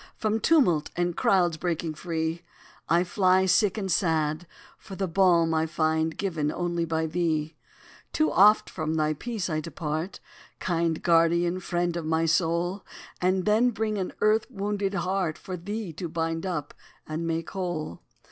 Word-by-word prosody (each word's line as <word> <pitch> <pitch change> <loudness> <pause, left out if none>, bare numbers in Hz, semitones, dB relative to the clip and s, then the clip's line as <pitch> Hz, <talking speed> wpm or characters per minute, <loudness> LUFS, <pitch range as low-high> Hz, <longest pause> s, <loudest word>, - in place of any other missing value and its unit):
From 220 0 0
tumult 220 - +3
and 175 -1 0
crowds 175 -4 +2
breaking 165 -1 -2
free, 160 +1 -3 0.5
I 170 +2 +4
fly, 185 0 +3
sick 190 +2 +3
and 195 -3 -2
sad, 160 -2 0 0.3
for 195 - -10
the 190 0 -2
balm 170 -2 +3
I 160 0 +1
find 160 0 0
given 160 -7 -1
only 175 -1 -1
by 160 0 -1
thee. 160 -2 -1 0.6
Too 310 - +1
oft 210 +3 +5
from 155 -2 -3
thy 155 -1 +1
peace 220 +4 -4
I 155 -3 -1
depart, 160 +2 -4 0.4
Kind 165 -2 -1
guardian, 170 +1 +3
friend 175 -1 -1
of 165 -2 -4
my 160 +1 +1
soul, 170 +3 0 0.4
And 185 0 +1
then 220 +4 +4
bring 215 -2 -2
an 185 - -3
earth 215 +2 +3
wounded 200 -3 -2
heart 180 -2 -1
For 185 - -6
thee 200 +1 -5
to 170 +2 -5
bind 165 +2 -2
up 150 -5 -4 0.3
and 160 +2 -4
make 165 0 -2
whole. 175 - -4
175 Hz, 155 wpm, -26 LUFS, 160-190 Hz, 0.6 s, oft